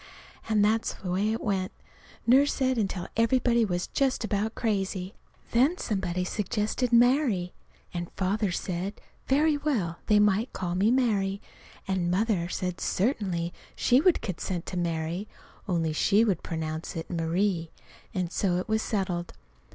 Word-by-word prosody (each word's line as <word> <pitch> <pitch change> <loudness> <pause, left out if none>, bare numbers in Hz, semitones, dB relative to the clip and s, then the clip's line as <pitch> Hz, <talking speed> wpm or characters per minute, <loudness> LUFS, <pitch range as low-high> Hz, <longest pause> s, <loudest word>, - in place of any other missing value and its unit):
And 210 -2 +4
that's 220 +1 +1
the 180 - -5
way 200 +4 +1
it 225 - -2
went, 195 -3 -1 0.5
Nurse 270 +4 +5
said, 260 -3 +1
until 190 -4 -2
everybody 235 0 +3
was 180 -4 -1
just 270 -3 0
about 215 +1 -1
crazy. 195 -3 -1 0.4
Then 270 +9 +3
somebody 185 - -1
suggested 215 +5 -1
"Mary." 240 -6 +3 0.4
And 175 -1 -4
Father 200 +1 0
said, 185 +3 -3 0.3
very 295 +3 +3
well, 225 - -1
they 210 - +5
might 210 +3 +3
call 175 -2 -3
me 195 +4 +3
Mary; 205 -6 +1 0.5
and 185 -2 0
Mother 185 -2 +1
said 180 0 -3
certainly, 185 -6 0 0.2
she 250 +2 +4
would 360 0 +4
consent 180 -2 -3
to - - -6
Mary, 170 +3 -2 0.4
only 165 -4 0
she 205 +7 +4
should 195 -6 0
pronounce 160 0 -4
it 165 +2 -5
Marie. 170 +1 0 0.4
And 180 -2 -2
so 185 -3 +1
it 180 - -3
was 220 0 +1
settled. 185 -6 -2
195 Hz, 145 wpm, -28 LUFS, 180-225 Hz, 0.5 s, Nurse